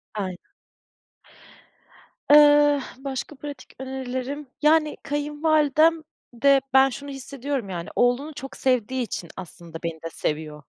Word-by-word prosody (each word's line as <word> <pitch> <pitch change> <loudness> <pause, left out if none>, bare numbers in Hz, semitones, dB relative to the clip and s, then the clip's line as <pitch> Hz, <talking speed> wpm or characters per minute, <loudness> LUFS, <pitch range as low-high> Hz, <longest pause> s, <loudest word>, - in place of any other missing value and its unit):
Aynen. 185 -4 -5 1.8
Iıı, 290 -1 +7 0.2
başka 270 +2 -5
pratik 285 0 -9
önerilerim. 265 +2 -5
Yani, 305 0 +3
kayınvalidem 300 +2 +2 0.3
de 275 +3 +4
ben 265 0 +6
şunu 285 +2 -8
hissediyorum. 270 -4 -4
Yani, 170 -2 -5
oğlunu 250 +5 +1
çok 270 0 -8
sevdiği 255 0 +1
için 180 -6 -5
aslında 170 -2 -8
beni 165 -1 -4
de 165 - -4
seviyor. 150 -1 -4
270 Hz, 110 wpm, -24 LUFS, 230-290 Hz, 1.8 s, Iıı